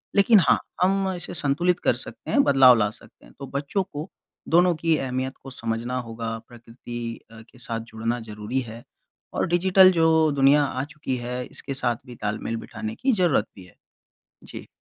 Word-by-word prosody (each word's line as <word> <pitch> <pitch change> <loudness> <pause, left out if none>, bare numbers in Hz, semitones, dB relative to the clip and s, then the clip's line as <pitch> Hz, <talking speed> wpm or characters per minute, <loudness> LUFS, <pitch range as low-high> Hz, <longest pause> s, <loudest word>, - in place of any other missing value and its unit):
लेकिन 200 +1 +6
हाँ, - - +5 0.2
हम 195 +1 +2
इसे 175 0 -5
संतुलित 175 +4 +1
कर - - +1
सकते - - -8
हैं, 285 - +5
बदलाव 135 - +7
ला 105 -2 +2
सकते 110 - -17
हैं। - - -18
तो 140 - -7
बच्चों 145 +8 -1
को 155 0 -8 0.4
दोनों 175 +1 +4
की 165 0 +1
अहमियत 130 0 -3
को 135 - -8
समझना 115 +1 -3
होगा, 115 0 -5
प्रकृति 120 0 -8
अ, 110 - -12
के 125 +3 -20
साथ 115 -2 -4
जुड़ना 115 +2 -2
ज़रूरी 105 +5 -3
है, 115 +2 -10 0.5
और - - 0
डिजिटल 185 +2 +5
जो 160 -2 +3
दुनिया 140 +2 +5
आ 130 -2 -2
चुकी 145 -3 -5
है, 125 +1 -4
इसके 135 - -7
साथ 120 -2 0
भी 125 -2 -11
तालमेल 110 +1 -3
बिठाने 220 - -6
की 265 +2 +1
ज़रूरत 175 - +2
भी 95 - -12
है। 90 - -20 0.7
जी। - - -10
135 Hz, 180 wpm, -24 LUFS, 115-170 Hz, 0.7 s, बदलाव